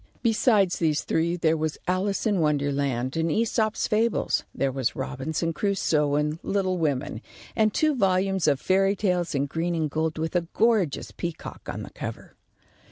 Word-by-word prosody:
Besides 215 -5 +3
these 155 -3 +1
three, 170 +2 0
there 160 -1 +2
was 155 -1 -2
"Alice 190 +4 0
in 205 -4 +2
Wonderland," 140 -4 0
and 165 0 0
"Æsop's 220 +3 +1
Fables," 225 +2 +1
there 135 -1 -1
was 130 -2 -1
"Robinson 145 +5 -2
Crusoe," 155 -6 +1
and 150 +2 0
"Little 190 -2 0
Women," 135 -7 -1 0.3
and 215 -1 +3
two 310 +7 +2
volumes 190 - +1
of 140 -2 +3
fairy 195 +3 +2
tales 180 -5 0
in 140 0 +1
green 165 +4 -2
and 155 -3 -1
gold 160 +1 -1
with 160 +2 -3
a 170 -1 +1
gorgeous 220 -10 +2
peacock 170 -2 -6
on - - -6
the - - -10
cover. - - -7
165 Hz, 165 wpm, -26 LUFS, 150-195 Hz, 0.3 s, Besides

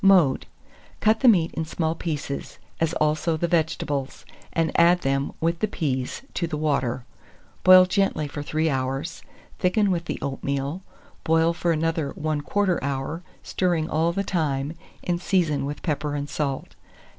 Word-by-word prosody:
Mode. 180 -9 +5 0.5
Cut 220 +1 +3
the 260 - +4
meat 175 -8 +5
in 160 - -2
small 160 0 -1
pieces, 150 -4 -4 0.2
as 165 0 +1
also 155 +2 +1
the 170 - 0
vegetables, 150 -4 -1 0.3
and 165 -1 +1
add 175 +1 +5
them, 135 +1 0
with 165 +1 0
the 215 - +1
peas, 130 - -2
to 170 - -1
the 155 -2 -3
water. 135 -5 0 0.6
Boil 185 0 +9
gently 195 -5 +1
for 145 +1 -6
3 155 +2 0
hours; 135 +3 -2 0.4
thicken 195 +2 +2
with 170 -2 -1
the - - -3
oatmeal, 140 +4 -3 0.4
boil 165 +1 +3
for 170 0 0
another 160 -3 0
1/4 155 +5 0
hour, 140 +4 -3 0.2
stirring 175 -4 0
all 165 +2 +2
the 195 +3 -1
time, 150 -6 -1 0.3
and 175 -1 -1
season 170 -8 +1
with 145 - -6
pepper 150 -2 -1
and 145 0 -3
salt. 140 -3 -2
160 Hz, 155 wpm, -25 LUFS, 145-175 Hz, 0.6 s, Boil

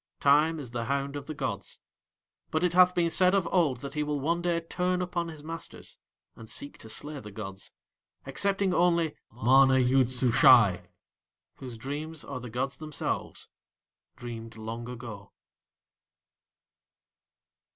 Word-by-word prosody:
Time 150 +3 +4
is 130 -5 -8
the 120 -1 -3
hound 140 +2 -2
of 140 -1 -6
the 155 - -4
gods; - - -4 0.7
but 160 +2 -1
it 180 -1 +2
hath 180 0 +6
been 170 -1 +2
said 185 +2 +4
of 190 -4 +1
old 150 -10 +2
that 140 -1 -6
he 150 - -1
will 150 -1 -1
one 165 +5 0
day 170 -1 +1
turn 180 +2 -1
upon 175 -1 -2
his 155 -3 -9
masters, 165 +1 -9 0.4
and 110 -1 -12
seek 140 - -6
to 110 - -11
slay 150 +6 -3
the 105 - -10
gods, 95 -2 -8 0.5
excepting 195 +6 0
only 170 -3 +2 0.2
MANA 130 +3 +5
YOOD 130 0 +3
SUSHAI, 125 -5 +5 0.7
whose 125 -3 -8
dreams 150 +6 -6
are 135 -2 -5
the 125 -1 -8
gods 130 +4 -3
themselves 155 -2 -4 0.7
dreamed 115 -3 -8
long 115 +2 -6
ago. 115 -5 -9
140 Hz, 145 wpm, -28 LUFS, 120-165 Hz, 0.7 s, hath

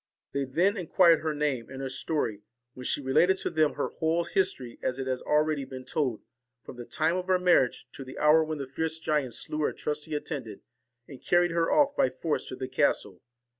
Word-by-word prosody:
They 140 0 -1
then 175 - +1
inquired 170 -2 +4
her 155 -1 -2
name 145 -6 -1
and 135 0 -8
her 135 - -3
story, 130 -5 -2 0.3
when 125 - -9
she 145 - -1
related 175 +8 +3
to - - -3
them 155 -2 +2
her - - -2
whole 165 +1 0
history, 135 -11 -1
as 125 - -1
it 135 - -3
has 130 -1 -2
been - - -14
already 150 -2 +2 0.2
told, 130 -3 -2 0.4
from - - -10
the 120 - -7
time 160 +7 +1
of 185 0 -4
her 185 -1 +4
mar 180 -7 +4
riage - - -14
to 135 - -9
the 130 0 -10
hour 155 +2 +5
when 155 0 -4
the 140 - -4
fierce 160 +4 -3
giant 150 -7 -1
slew 150 - -3
her 150 - +1
trusty 150 +1 -4
attendant, 150 - -5 0.4
and 135 -3 -11
carried 175 0 +3
her 165 0 +1
off 290 -1 +3
by 130 - +3
force 155 +3 -3
to - - -6
the 130 0 -5
castle. 130 -8 0
150 Hz, 215 wpm, -28 LUFS, 130-165 Hz, 0.4 s, hour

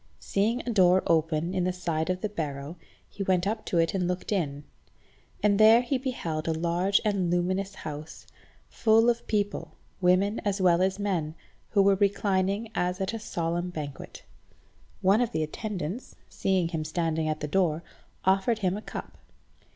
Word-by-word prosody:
Seeing 220 +5 0
a - - +1
door 185 -2 +5
open 160 +1 +1
in 185 -1 0
the 185 - +1
side 170 -2 -2
of 185 0 -1
the 215 - -1
barrow 150 -4 -4 0.3
he 200 - -9
went 185 -2 +1
up 215 +2 -2
to 175 - -1
it 165 0 +2
and 185 -2 0
looked 180 +3 -3
in, 150 -8 -1 0.8
and 205 -1 +3
there 220 +2 +8
he 255 +2 -1
beheld 170 - -3
a 165 - +2
large 175 +4 +2
and 195 -4 +1
luminous 185 +3 0
house, 155 0 -8 0.4
full 225 +1 +4
of 235 0 -6
people, 205 -2 -2 0.3
women 190 +4 +3
as 200 -2 -1
well 180 -2 +4
as 190 0 +1
men, 175 -7 -2 0.3
who 200 -2 +4
were 200 0 +5
reclining 200 +2 +1
as 180 -3 -1
at 190 +3 -2
a 225 - -3
solemn 175 -3 -2
banquet. 150 -5 -7 0.8
One 195 +5 +4
of 240 -2 -1
the 155 - 0
attendants, 195 +5 -5
seeing 185 -3 0
him 160 -3 -2
standing 160 0 -1
at 155 0 -2
the 150 - -2
door, 165 -1 +1 0.4
offered 195 +4 +3
him 185 +1 +2
a 210 - -5
cup. - - -8
185 Hz, 175 wpm, -27 LUFS, 165-205 Hz, 0.8 s, there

